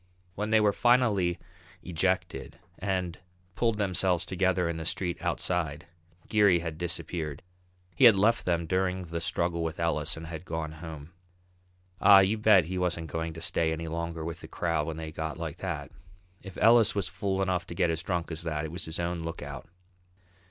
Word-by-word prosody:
When 105 +3 -3
they 110 0 +5
were 105 -1 +3
finally 110 -9 +3 0.5
ejected, 90 0 -1 0.2
and 90 -3 -2 0.3
pulled 115 +1 +1
themselves 95 -3 +1
together 95 -1 +1
in 85 -1 -2
the 80 - -4
street 90 0 -2
outside, 85 -3 -1 0.4
Geary 105 -4 +5
had 85 -2 -5
disappeared. 85 -4 -3 0.5
He 95 - +5
had 115 -4 +9
left 110 +5 +3
them 85 -1 +1
during 95 +1 0
the 85 -2 -5
struggle 85 0 -1
with 80 -1 -4
Ellis 80 -2 0
and 80 - -7
had 80 0 -7
gone 80 -2 -4
home. 80 -1 -9 0.9
Ah, 100 -1 +8
you 100 +3 +1
bet 105 -5 +6
he 90 +2 -3
wasn't 85 -3 -2
going 80 +1 -3
to 80 +1 -6
stay 80 -1 +1
any 80 +1 -3
longer 85 0 -4
with 85 -1 -5
the - - -9
crowd 85 -3 -1
when 80 -1 -4
they 80 -1 -6
got 80 0 -4
like 80 -1 -5
that. 80 -6 -4 0.5
If 95 -2 -10
Ellis 115 -1 +5
was 100 -4 0
fool 95 -2 -2
enough 90 -2 0
to 85 - -7
get 85 -2 +2
as 80 0 -2
drunk 85 -1 -2
as 80 - -3
that 80 -2 -2
it 80 - -6
was 90 +3 -4
his 80 +1 -5
own 85 0 -2
lookout. 70 -4 -6
85 Hz, 185 wpm, -29 LUFS, 80-95 Hz, 0.9 s, had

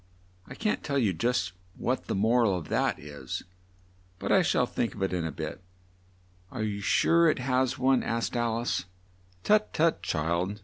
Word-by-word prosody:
I - - -9
can't 215 -2 -1
tell 140 -1 -1
you 110 -8 +2
just 95 0 0
now 90 - -32 0.2
what - - 0
the - - -2
mor 115 +5 +3
al 100 -4 +2
of 85 -4 -6
that - - +1
is, 70 -3 -6 0.7
but - - -3
I - - +6
shall - - +2
think 115 - -2
of 100 - -3
it 95 - 0
in 85 -2 -1
a 80 - -2
bit." 80 - -6 0.9
"Are 110 - -4
you 105 -1 -2
sure 165 +10 +4
it - - +1
has 130 0 0
one?" 130 0 +3
asked 115 +2 -2
Al 120 -1 0
ice. 120 -5 -1 0.6
"Tut, 215 0 +3
tut, 165 +1 +2
child!" 85 +6 -1
115 Hz, 190 wpm, -28 LUFS, 90-130 Hz, 0.9 s, I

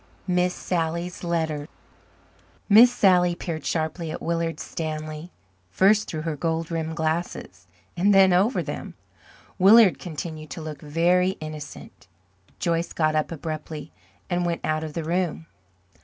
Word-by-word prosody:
Miss 180 -1 +1
Sally's 170 +1 -3
Letter 160 -4 -1 1.0
Miss 225 +4 +8
Sally 180 -6 +4
peered 165 -2 -5
sharply 160 +1 -2
at - - -5
Willard 165 -1 -2
Stanley, 155 0 -5 0.4
first 200 - +3
through 155 -3 -4
her 160 -2 -2
gold 165 +2 -2
rimmed 160 -1 -2
glasses 160 - -3 0.3
and 195 +4 +3
then 190 -2 +6
over 200 +8 +2
them. - - -6 0.6
Willard 200 +1 +7
continued 155 -2 -6
to - - -7
look 155 -2 -7
very 175 +5 +2
innocent. 155 -1 -9 0.5
Joyce 170 0 -1
got 155 -1 +1
up 155 +1 0
abruptly 155 -1 -6 0.4
and 175 0 0
went 170 -1 -1
out 155 0 0
of 155 -1 -6
the 165 - -3
room. 170 0 -1
165 Hz, 135 wpm, -24 LUFS, 155-180 Hz, 1.0 s, Miss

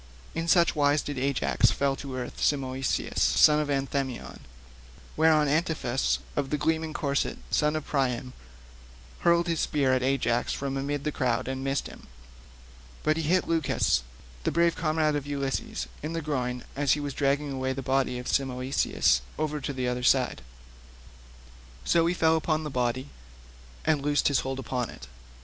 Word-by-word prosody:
In 165 0 -3
such 170 0 +4
wise 145 0 +3
did 145 -3 -4
Ajax 135 0 +2
fell 140 -1 0
to 135 -2 -6
earth 125 -1 -6
Simoeisius, 135 -2 0
son 150 0 +5
of 150 - -1
Anthemion. 135 -2 -2 0.8
Thereon 155 -1 +4
Antiphus 150 -4 0 0.2
of 140 -2 -1
the 150 - 0
gleaming 160 +1 0
corslet, 140 -3 -1
son 150 0 +2
of 155 - -3
Priam, 130 -3 -1 0.9
hurled 170 0 +3
a 170 - +1
spear 140 -4 +1
at 130 - +2
Ajax 125 -3 +1
from 135 -1 -3
amid 140 +1 -2
the 150 - -1
crowd 125 -5 0
and 130 0 -3
missed 135 0 -1
him, - - -11 1.0
but 155 - +2
he 165 - -1
hit 175 +4 +1
Leucus, 160 - +1 0.4
the - - +1
brave 170 0 +3
comrade 155 -1 +1
of 145 -1 -3
Ulysses, 140 -2 -2 0.2
in 155 +2 -4
the 165 - -2
groin, 125 -4 -2
as 140 -1 +3
he 150 - -1
was 145 -1 -4
dragging 140 -1 0
the 130 +1 -1
body 130 -1 +1
of 125 - -6
Simoeisius 130 - +1 0.2
over 150 -1 -2
to 140 - -3
the 130 -2 -2
other 125 0 -1
side; 125 - +2 1.4
so 165 -1 +3
he 175 - +1
fell 160 -1 +3
upon 155 0 0
the 150 - -5
body 125 +2 -1 0.8
and 155 -3 +2
loosed 145 +1 +2
his 140 - +2
hold 135 0 -3
upon 125 -2 -3
it. - - -10
140 Hz, 165 wpm, -27 LUFS, 130-155 Hz, 1.4 s, son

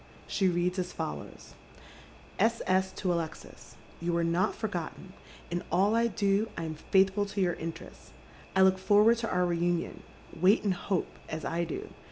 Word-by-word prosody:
She 190 - +1
reads 180 +1 0
as 180 -1 -2
follows: 75 -1 -6 0.3
— - - -19 0.2
" - - -23
S. 230 +3 +2
S. 190 0 +2
to 180 -3 -1
Alexis. 165 -2 -6 0.3
You 170 0 0
are 170 - +1
not 170 +2 +1
forgotten. 185 -2 -5 0.4
In 175 0 -1
all 195 +4 +3
I 230 +1 +3
do 205 0 +1
I 170 - -3
am 160 -1 -4 0.2
faithfiil 195 +1 +3
to 200 - -1
your 175 -2 +2
interests. 165 0 -8 0.4
I 190 - +6
look 190 0 +4
forward 210 +4 +5
to 230 - -2
our 180 0 +2
reunion. 175 0 -1 0.3
Wait 185 +6 +4
and 200 -3 +2
hope, 185 0 -3
as 155 0 -4
I 170 +1 -1
do. 160 - -5
185 Hz, 180 wpm, -30 LUFS, 170-200 Hz, 0.4 s, I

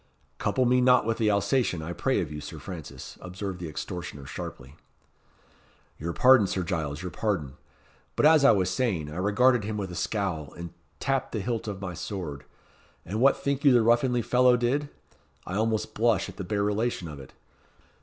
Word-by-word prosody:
"Couple 130 - +1
me 125 +1 +4
not 125 -2 +5
with 115 +1 -1
the 110 -2 +3
Alsatian, 100 -3 +1
I 85 +2 -4
pray - - 0
of - - -5
you, 75 0 -6
Sir - - -8
Francis," 85 -5 -9
observed 95 0 -6
the 85 -2 -5
extortioner, 75 -3 -6
sharply. 65 +1 -8 1.2
"Your 85 +2 -3
pardon, 125 +1 +6
Sir 95 0 -2
Giles 80 -3 -3
your 90 - -4
pardon! 90 -12 -2 0.6
But - - +2
as 155 -2 +6
I 140 - +7
was 95 -3 +3
saying, 95 - -1
I 80 - -7
regarded 105 +5 +3
him 105 +1 -3
with 95 -3 -4
a - - -7
scowl, 85 -7 -2
and 85 -1 -7 0.3
tapped 135 -1 -1
the 110 - -1
hilt 115 +2 -3
of 100 -2 -4
my 90 -2 -4
sword. 85 -6 -6 0.6
And 105 +6 -3
what 135 +1 +5
think 140 0 -2
you 140 - +7
the 120 -2 +5
ruffianly 120 +1 +3
fellow 125 +1 +4
did? 135 +5 0 0.6
I 90 - -6
almost 110 +1 0
blush 115 0 +2
at - - -12
the 95 - -4
bare 100 +2 -1
relation 105 -2 -1
of 75 -3 -8
it. 65 - -12
100 Hz, 190 wpm, -27 LUFS, 85-120 Hz, 1.2 s, I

